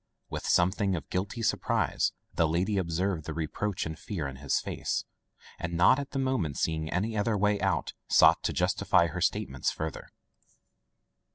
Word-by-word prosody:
With -, -, -4 dB
something 95 Hz, +2 st, +2 dB
of 70 Hz, -6 st, -7 dB
guilty 95 Hz, +5 st, -2 dB
surprise -, -, +1 dB, 0.2 s
the 85 Hz, -, +2 dB
lady 90 Hz, +6 st, +1 dB
observed 85 Hz, -1 st, -1 dB
the 80 Hz, -, -5 dB
reproach 90 Hz, +5 st, -2 dB
and 80 Hz, 0 st, -6 dB
fear 80 Hz, -7 st, -4 dB
in 65 Hz, -1 st, -8 dB
his 70 Hz, 0 st, 0 dB
face, -, -, -3 dB, 0.5 s
and 85 Hz, 0 st, -4 dB
not 90 Hz, +10 st, +5 dB
at 140 Hz, -, -5 dB
the 140 Hz, -, -5 dB
moment 130 Hz, -, 0 dB
seeing 80 Hz, -1 st, -1 dB
any 105 Hz, +6 st, -1 dB
other 105 Hz, +1 st, +1 dB
way 105 Hz, +1 st, +2 dB
out, -, -, 0 dB
sought -, -, +6 dB
to -, -, +1 dB
justify 85 Hz, -, +2 dB
her 85 Hz, +2 st, -4 dB
statements 90 Hz, -9 st, 0 dB
further. 80 Hz, -2 st, -5 dB
90 Hz, 165 wpm, -29 LUFS, 80-105 Hz, 0.5 s, sought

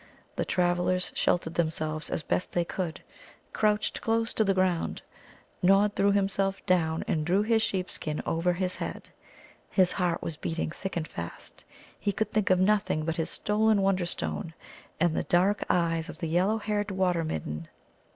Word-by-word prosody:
The -, -, -1 dB
travellers 180 Hz, 0 st, +1 dB
sheltered 165 Hz, -2 st, +1 dB
themselves 155 Hz, -2 st, -1 dB
as 160 Hz, -, -2 dB
best 180 Hz, -, -1 dB
they 175 Hz, -1 st, +1 dB
could, 170 Hz, -2 st, -4 dB, 0.5 s
crouched 210 Hz, 0 st, +1 dB
close 225 Hz, 0 st, 0 dB
to 220 Hz, -, +2 dB
the 195 Hz, -2 st, +2 dB
ground. 185 Hz, -3 st, 0 dB, 0.6 s
Nod 195 Hz, +2 st, +4 dB
threw 200 Hz, +1 st, +3 dB
himself 195 Hz, -1 st, 0 dB
down 160 Hz, -3 st, +2 dB
and 155 Hz, -, 0 dB
drew 185 Hz, +6 st, +2 dB
his 225 Hz, 0 st, +3 dB
sheep 185 Hz, -4 st, -1 dB
skin 155 Hz, -1 st, -3 dB
over 170 Hz, +2 st, +1 dB
his 185 Hz, +1 st, -2 dB
head. -, -, -6 dB, 0.6 s
His 185 Hz, -2 st, +3 dB
heart 180 Hz, -3 st, 0 dB
was 160 Hz, -2 st, -4 dB
beating 165 Hz, 0 st, -2 dB
thick 190 Hz, +1 st, -5 dB
and 160 Hz, -2 st, -2 dB
fast. 85 Hz, 0 st, -8 dB, 0.4 s
He 205 Hz, -, 0 dB
could 215 Hz, +2 st, -2 dB
think 215 Hz, -2 st, +1 dB
of 185 Hz, -1 st, +4 dB
nothing 195 Hz, -5 st, +2 dB
but 165 Hz, +1 st, -2 dB
his 165 Hz, -1 st, -1 dB
stolen 210 Hz, -1 st, +2 dB
Wonderstone 170 Hz, -, -1 dB, 0.4 s
and 175 Hz, -3 st, +2 dB
the -, -, +1 dB
dark 190 Hz, +4 st, +2 dB
eyes 165 Hz, -1 st, +1 dB
of 160 Hz, -, -7 dB
the 165 Hz, -, -3 dB
yellow 185 Hz, +6 st, +2 dB
haired 210 Hz, -1 st, -1 dB
Water 185 Hz, -3 st, +1 dB
midden. 80 Hz, -, -4 dB
180 Hz, 170 wpm, -28 LUFS, 165-200 Hz, 0.6 s, Nod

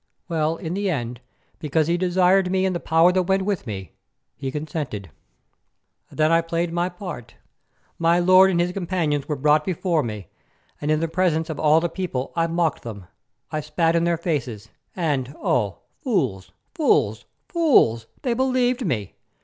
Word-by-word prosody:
Well, 160 Hz, -2 st, 0 dB
in 165 Hz, +1 st, -5 dB
the 200 Hz, +1 st, -1 dB
end, 120 Hz, -6 st, -3 dB, 0.4 s
because 155 Hz, +1 st, +1 dB
he 170 Hz, +2 st, +1 dB
desired 180 Hz, +1 st, +3 dB
me 190 Hz, 0 st, +1 dB
and 185 Hz, -1 st, 0 dB
the -, -, -1 dB
power 165 Hz, +2 st, +4 dB
that 185 Hz, 0 st, +2 dB
went 190 Hz, +1 st, +1 dB
with 195 Hz, -10 st, -2 dB
me, 95 Hz, -3 st, -6 dB, 0.4 s
he 135 Hz, -, -4 dB
consented. 145 Hz, -, -5 dB, 1.0 s
Then 155 Hz, +1 st, +2 dB
I 165 Hz, 0 st, +5 dB
played 165 Hz, 0 st, -2 dB
my 175 Hz, +1 st, 0 dB
part. 175 Hz, -, -8 dB, 0.6 s
My 170 Hz, +1 st, +3 dB
lord 185 Hz, +2 st, +6 dB
and 175 Hz, -2 st, +1 dB
his 175 Hz, +1 st, +1 dB
companions 170 Hz, -6 st, -1 dB
were 150 Hz, -, -1 dB
brought 150 Hz, +2 st, +3 dB
before 175 Hz, -2 st, 0 dB
me, 105 Hz, -, -6 dB, 0.5 s
and 150 Hz, -, -2 dB
in 155 Hz, +2 st, +1 dB
presence 165 Hz, -2 st, +1 dB
of 155 Hz, -, -6 dB
all 155 Hz, +1 st, +5 dB
the 170 Hz, -, 0 dB
people 165 Hz, -8 st, -4 dB
I 165 Hz, -1 st, +1 dB
mocked 165 Hz, -2 st, 0 dB
them; 100 Hz, -5 st, -8 dB, 0.5 s
I 155 Hz, -, -1 dB
spat 165 Hz, +2 st, +1 dB
in 170 Hz, -, +2 dB
their 170 Hz, -1 st, +1 dB
faces, 130 Hz, -, -3 dB, 0.3 s
and 145 Hz, -6 st, -1 dB
oh! 105 Hz, -7 st, -1 dB, 0.2 s
fools, 120 Hz, -, -1 dB, 0.2 s
fools, 310 Hz, -, +1 dB, 0.2 s
fools, 235 Hz, -, +3 dB, 0.2 s
they 250 Hz, -3 st, +1 dB
believed 255 Hz, 0 st, +1 dB
me! 110 Hz, -, -2 dB
165 Hz, 165 wpm, -23 LUFS, 145-180 Hz, 1.0 s, lord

